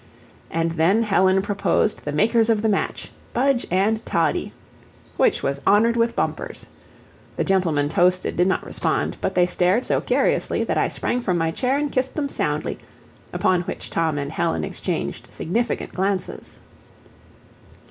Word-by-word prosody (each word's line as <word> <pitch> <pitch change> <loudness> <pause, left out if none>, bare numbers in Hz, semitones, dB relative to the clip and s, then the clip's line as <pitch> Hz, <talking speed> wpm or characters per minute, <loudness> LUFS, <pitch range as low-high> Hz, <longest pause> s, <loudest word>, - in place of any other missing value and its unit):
And 165 0 -1
then 170 +8 +2
Helen 190 -2 +3
proposed 205 +1 0
"the 150 - -2
makers 225 +8 +2
of 220 -2 +2
the 220 - +2
match 200 - -2 0.2
Budge 265 0 +1
and 210 +5 +1
Toddie!" 165 -1 0 0.6
which - - +2
was 140 0 -2
honored 220 +4 +4
with 235 0 +1
bumpers. - - -3 0.7
The - - 0
gentlemen 170 -7 +1
toasted 180 +4 +1
did 175 +2 +3
not 190 - 0
respond, - - -1
but - - -2
they 180 -1 +5
stared 180 +6 +1
so - - +1
curiously - - +1
that - - -1
I - - +2
sprang 250 - -2
from 185 -6 0
my 165 -1 0
chair 255 +9 0
and 295 0 -1
kissed 260 0 -1
them 285 -2 -1
soundly, - - -2 0.5
upon 180 -1 +1
which 185 +2 -6
Tom 160 -3 0
and 140 0 -3
Helen 80 - -1
exchanged - - -4
significant 230 +8 -2
glances. 190 0 -3
190 Hz, 155 wpm, -22 LUFS, 170-230 Hz, 0.7 s, they